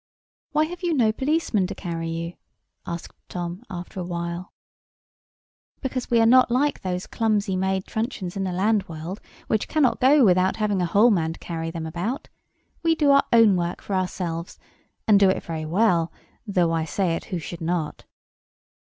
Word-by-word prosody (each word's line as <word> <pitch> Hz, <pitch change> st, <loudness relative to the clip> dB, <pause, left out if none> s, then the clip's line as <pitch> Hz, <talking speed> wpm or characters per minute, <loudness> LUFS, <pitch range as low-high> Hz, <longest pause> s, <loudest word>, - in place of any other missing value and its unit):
"Why 305 Hz, +1 st, +3 dB
have 350 Hz, +3 st, -8 dB
you 345 Hz, -3 st, 0 dB
no 230 Hz, -5 st, +4 dB
policeman 265 Hz, -, 0 dB
to 200 Hz, -, -6 dB
carry 165 Hz, -3 st, -4 dB
you?" 165 Hz, +1 st, -4 dB, 0.5 s
asked 170 Hz, 0 st, -6 dB, 0.2 s
Tom, 175 Hz, +2 st, -5 dB
after 180 Hz, 0 st, -7 dB
a -, -, -2 dB
while. 170 Hz, +1 st, -4 dB, 1.3 s
"Because 260 Hz, -2 st, -3 dB
we 235 Hz, -, +4 dB
are 225 Hz, -, +5 dB
not 255 Hz, +2 st, +6 dB
like 275 Hz, +4 st, +1 dB
those 180 Hz, -1 st, -3 dB
clumsy 210 Hz, -4 st, 0 dB
made 190 Hz, 0 st, 0 dB
truncheons 220 Hz, -5 st, -3 dB
in 195 Hz, -, -2 dB
the 185 Hz, -, -1 dB
land 200 Hz, +2 st, +1 dB
world, 165 Hz, +5 st, -6 dB, 0.2 s
which 215 Hz, -, 0 dB
cannot 300 Hz, -6 st, +2 dB
go 270 Hz, +1 st, +6 dB
without 185 Hz, 0 st, +3 dB
having 205 Hz, -3 st, 0 dB
a 175 Hz, -, +1 dB
whole 215 Hz, +7 st, +5 dB
man 165 Hz, -5 st, +1 dB
to -, -, -14 dB
carry 165 Hz, -1 st, -4 dB
them 165 Hz, -1 st, -5 dB
about. 180 Hz, -, -4 dB, 0.5 s
We 330 Hz, -1 st, +3 dB
do 295 Hz, -3 st, +3 dB
our 280 Hz, 0 st, +5 dB
own 225 Hz, -4 st, +6 dB
work 175 Hz, 0 st, -2 dB
for 200 Hz, -, -6 dB
ourselves; 180 Hz, -2 st, -3 dB, 0.5 s
and 210 Hz, -2 st, +6 dB
do 195 Hz, -1 st, +6 dB
it 190 Hz, -, 0 dB
very 160 Hz, -2 st, -4 dB
well, 170 Hz, -1 st, +2 dB, 0.4 s
though 180 Hz, -5 st, +2 dB
I 165 Hz, -1 st, +1 dB
say 165 Hz, +2 st, 0 dB
it -, -, -6 dB
who 180 Hz, -, -3 dB
should 170 Hz, +1 st, -7 dB
not." 165 Hz, -2 st, -2 dB
190 Hz, 180 wpm, -24 LUFS, 170-225 Hz, 1.3 s, not